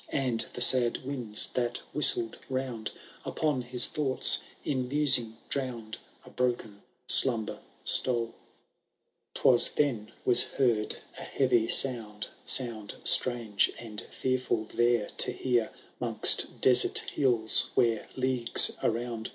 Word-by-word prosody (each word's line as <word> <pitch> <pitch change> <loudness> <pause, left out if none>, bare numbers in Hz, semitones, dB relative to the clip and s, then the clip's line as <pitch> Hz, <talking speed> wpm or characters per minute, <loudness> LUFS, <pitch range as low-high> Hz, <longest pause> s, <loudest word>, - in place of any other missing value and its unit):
And 130 -5 -5
the - - -6
sad 125 0 +4
winds 125 -6 +1
that 120 -1 -4
whistled 120 -6 +3
round. 130 -4 -7 0.3
Upon 150 -5 -5
his 125 0 +3
thoughts, 140 -4 +2 0.3
in 130 -3 -5
musing 130 -5 +2
drown'd« 120 -5 -8 0.3
A - - -18
broken 120 -5 -6 0.3
slumber 115 -5 +4 0.2
stole. 115 -3 -1 1.0
VI. - - -7
^TWka 120 - +1
then 125 -8 -5
was 125 - +5
heard 115 -5 -4 0.2
a - - -11
heavy 125 -4 -3
sound, 115 -5 -1 0.2
(Sound, 115 -5 +1
strange 115 -5 +1
and 110 -2 -9
fearful 130 -3 -5
there 120 -2 -2
to - - 0
hear, 120 -3 -4 0.3
*Hong8t - - +2
desert 125 -1 +4 0.2
hills, 120 -6 0
where, 115 -2 -3
leagues 130 -2 +4
around. 115 -1 -6
120 Hz, 120 wpm, -24 LUFS, 115-130 Hz, 1.0 s, was